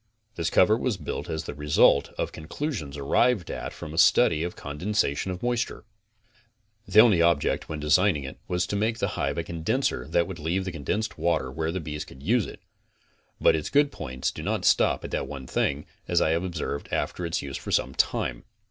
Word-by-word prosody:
This 85 -3 -1
cover 110 +4 +5
was 120 -3 -1
built - - -5
as 80 - -2
the - - -6
result 75 -1 +3
of - - -2
conclusions 80 - -5
arrived 100 - +2
at - - -5
from - - -8
a - - -1
study 80 -2 +5
of 85 +1 -3
condensation 75 +2 -1
of 90 +3 -6
moisture. 120 0 -1 1.0
The 100 +2 +5
only 105 -7 +5
object 85 -4 +2
when 80 - -4
designing 75 +1 +3
it 65 - -8
was 90 0 0
to 100 - -3
make 110 +3 0
the - - -1
hive 70 +3 -2
a 85 - -1
condenser 85 +12 -1
that 85 - +2
would 95 -3 -7
jleave 85 +4 -1
the 95 - -4
condensed 105 +8 -3
water 80 -7 0
where 80 +3 -2
the 95 - -3
bees 75 -2 -5
could 65 - -14
use 115 +4 +2
it, - - -11 0.8
but - - +5
its 75 - -3
good 145 0 +3
points 65 -3 -3
do - - -8
not - - -2
stop - - +3
at - - -7
that - - -2
one 70 -2 -7
thing, 70 +3 -1 0.2
as - - +3
I 80 - +2
have 85 +2 +1
observed 80 -5 -4
after 90 - -2
its 85 -3 -2
use 70 -1 -5
for - - -7
some 65 - +1
time. 60 -2 0
85 Hz, 205 wpm, -26 LUFS, 75-100 Hz, 1.0 s, cover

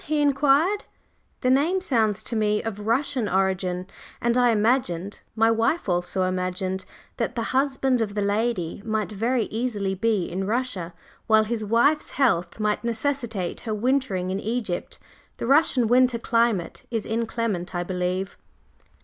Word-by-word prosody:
he 305 0 0
inquired. 290 +7 +3 0.6
"The 255 - +2
name 310 +8 +3
sounds 220 - +1
to 235 - -3
me 210 -1 +1
of 210 -2 -5
Russian 255 -1 +1
origin, 185 -1 0 0.3
and 235 0 +1
I 245 -1 +4
imagined 210 -5 0
my 225 0 +4
wife 230 +8 +1
also 180 +1 0
imagined, 185 +1 -2 0.3
that 230 +1 -2
the 230 - -1
husband 265 -2 +1
of 210 -2 -2
the 205 - 0
lady 205 -4 -1
might 220 -1 -2
very 230 +4 0
easily 215 -4 -1
be 205 -1 0
in 190 +2 -3
Russia 210 -7 -2 0.3
while 220 0 +5
his 220 0 -3
wife's 240 +8 +2
health 185 -9 +1
might 210 0 0
necessitate 235 -5 -2
her 220 -2 -3
wintering 210 -6 0
in 190 - -2
Egypt. 215 -4 -3 0.4
The - - -4
Russian 270 -2 +4
winter 250 0 +4
climate 230 -6 0
is 225 -3 -2
inclement, 225 -5 -2
I 175 - 0
believe." 180 +1 -2
220 Hz, 150 wpm, -24 LUFS, 190-250 Hz, 0.6 s, while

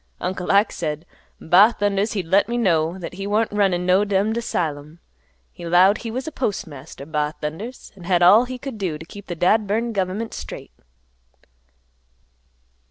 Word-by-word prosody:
Uncle 180 0 -2
Ike 200 +2 +4
said 155 -1 -4 0.3
'Ba 195 +8 +5
thundas!' 205 +1 0
he'd 195 -5 -2
let 195 +6 +2
me 240 - -1
know 170 -6 +1
that 180 -2 -7
he 195 +2 -5
warn't 215 +2 +1
runnin' 195 -4 +1
no 185 +2 +4
dummed 205 +2 0
asylum. 160 -8 -3 0.5
He - - -12
'lowed 180 +5 +4
he 230 - -6
was 255 +5 -4
postmaster, 160 - -5
'Ba 150 0 -2
thundas!' 195 +12 -6
an' 180 -3 -12
had 175 -1 +2
all 210 +7 +7
he 255 0 -6
could 250 -4 -7
do 175 -6 -2
t' 165 - -11
keep 205 +3 -12
th' 175 - -5
dad 210 +5 +2
burned 225 +3 -1
gov'ment 200 +3 -2
straight." - - -8
190 Hz, 165 wpm, -22 LUFS, 170-215 Hz, 0.5 s, all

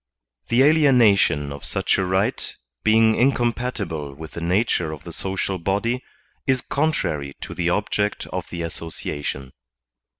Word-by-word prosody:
The 120 +2 +3
aliena 135 -8 +6
tion 75 -6 +1
of 70 - -10
such - - 0
a - - +2
right, 95 +1 0 0.3
being 110 0 +5
incompatible 120 - 0
with 80 +2 -9
the 85 - -7
nature 90 -2 +1
of 75 -3 -8
the - - -8
social 95 0 -2
body, 105 +8 -1 0.4
is 130 -2 +3
contrary 80 - -1
to - - -6
the 85 -1 0
object 105 +2 0
of - - -4
the 85 -1 -4
asso 85 0 -4
ciation. 70 -4 -5
95 Hz, 145 wpm, -23 LUFS, 80-120 Hz, 0.4 s, aliena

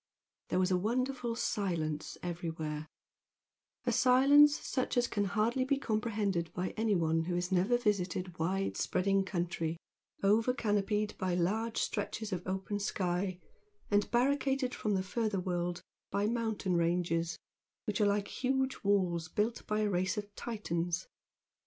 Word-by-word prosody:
There - - +1
was 185 0 +2
a 180 - +3
wonderful 245 +3 -1
silence 165 -9 -2
everywhere, 160 -3 -4 1.0
a - - +2
silence 280 +4 +6
such 255 -1 -2
as 245 0 +3
can 205 -2 0
hardly 215 +6 +1
be 275 +1 +1
comprehended 210 - -1
by 180 +1 -1
anyone 170 -7 +1
who 175 0 -1
has 180 +1 -1
never 190 +7 +3
visited 185 -5 -1
wide 190 +4 0
spreading 195 +1 +2
country, 170 -3 -2 0.5
over 220 +5 +3
canopied 210 -2 0
by 185 -2 0
large 220 +6 0
stretches 215 0 -2
of 180 -1 -4
open 190 +2 -2
sky, 185 -2 -1 0.5
and 205 0 +3
barricaded 265 +1 +1
from 210 -2 -1
the 190 - 0
further 215 0 -1
world 175 -1 -2 0.3
by 200 +1 0
mountain 220 -5 0
ranges 170 -1 +1 0.5
which 210 +1 -1
are 205 - +5
like 205 0 +1 0.2
huge 265 +1 +1
walls 180 -5 +2
built 210 +7 -1
by 215 0 +1
a 210 - +2
race 185 +1 0
of 205 0 -5
Titans. 175 -6 -2
200 Hz, 140 wpm, -32 LUFS, 175-225 Hz, 1.0 s, silence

